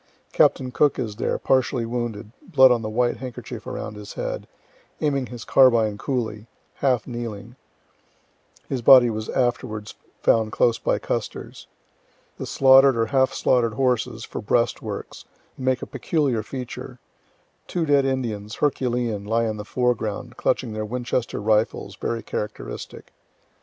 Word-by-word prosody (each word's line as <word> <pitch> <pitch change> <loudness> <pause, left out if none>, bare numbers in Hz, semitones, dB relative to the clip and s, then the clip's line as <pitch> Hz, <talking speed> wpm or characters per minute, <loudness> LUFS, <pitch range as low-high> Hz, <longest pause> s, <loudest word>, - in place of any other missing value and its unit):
Captain 130 -1 +3
Cook 145 +3 +2
is 110 -5 -4
there, - - -1
partially 130 -2 +1
wounded, 115 -3 -4
blood 130 -7 +5
on 120 -2 +2
the 110 - -4
white 120 +2 +1
handkerchief 130 -3 -8
around - - -5
his 105 0 -9
head, - - -4 0.5
aiming 140 -4 0
his 120 0 -9
carbine 115 -5 +4
coolly, 115 -4 -3 0.3
half 125 -5 +1
kneeling 120 -1 -6 1.1
(his 130 -3 -2
body 120 0 +8
was 110 0 -5
afterwards 120 -4 -1 0.3
found 110 -1 +3
close 115 -1 +2
by - - +1
Custer's.) - - -5 0.7
The - - -4
slaughter'd 135 -1 +6
or 115 - +2
half 130 +4 +2
slaughter'd 115 -3 +1
horses, 125 -3 0
for - - -6
breastworks, - - -2 0.3
make 130 -1 -1
a - - -3
peculiar 140 -9 0
feature. 125 +3 -7 0.7
Two 175 -2 -1
dead 145 -2 +4
Indians, 115 -6 -2
herculean, 120 -7 0
lie 115 +3 +1
in 110 -1 -2
the 105 - -5
foreground, 120 0 -2
clutching 125 -3 -1
their 110 0 -3
Winchester 120 +2 -2
rifles, 110 +1 0
very 115 -2 -3
characteristic. 105 - -6
120 Hz, 135 wpm, -23 LUFS, 110-130 Hz, 1.1 s, body